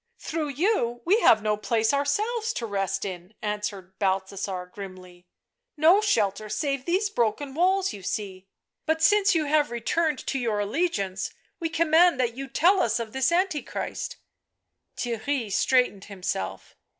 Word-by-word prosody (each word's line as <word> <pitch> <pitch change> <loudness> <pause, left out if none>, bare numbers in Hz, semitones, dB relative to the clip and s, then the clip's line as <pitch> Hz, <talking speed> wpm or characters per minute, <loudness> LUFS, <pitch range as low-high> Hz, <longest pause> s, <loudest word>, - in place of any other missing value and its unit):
" - - -52
Through 315 -1 -3
you 280 - 0
we 395 +6 +4
have 215 - +5
no 210 -1 +2
place 220 +3 +1
ourselves 425 +12 0
to 235 - -3
rest 195 -2 -2
in," 185 +1 -7
answered 205 -3 -4
Balthasar 190 -1 -1
grimly. 185 -2 -10 0.2
" 480 -3 -58
No 385 +5 +7
shelter 215 - +1
save 275 +1 -2
these 385 +4 +1
broken 270 - -1
walls 375 +4 +2
you 200 - -9
see; 190 0 -5 0.4
but 320 0 +1
since 400 0 +5
you 315 -2 +2
have 295 -1 +2
returned 300 +6 0
to 270 - -1
your 225 -4 -1
allegiance, 205 - -1 0.2
we 330 -2 -2
command 330 -1 +4
that 240 -2 +1
you 270 +3 -6
tell 355 +8 +3
us 230 0 +1
of 225 -2 -5
this 265 +3 +1
Antichrist 350 -3 -2 0.4
" - - -53
Theirry 235 -1 -2
straightened 205 -1 +2
himself. 180 - -5
245 Hz, 155 wpm, -26 LUFS, 200-330 Hz, 0.4 s, No